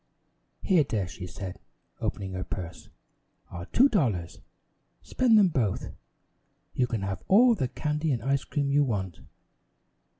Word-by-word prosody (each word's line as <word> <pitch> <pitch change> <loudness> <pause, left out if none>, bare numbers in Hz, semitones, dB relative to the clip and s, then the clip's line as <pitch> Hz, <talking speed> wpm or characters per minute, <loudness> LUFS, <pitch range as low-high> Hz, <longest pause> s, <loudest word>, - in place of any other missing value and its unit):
"Here, 180 -6 +4
dear," 105 -8 -2
she 90 0 -8
said, 95 0 -7 0.4
opening 95 -2 -3
her 90 0 -3
purse, 90 -3 -7 0.6
"are 90 +1 -7
two 265 - +5
dollars. 110 - -1 0.6
Spend 240 -4 +3
them 200 -3 +6
both. 115 - -1 0.8
You 125 - +1
can 115 -5 -3
have 95 -1 -3
all 235 +5 +6
the 155 - -1
candy 150 +4 -2
and 120 -4 -1
ice 135 0 +1
cream 140 -2 -1
you 145 +1 +4
want." 95 - -3
125 Hz, 140 wpm, -27 LUFS, 95-155 Hz, 0.8 s, them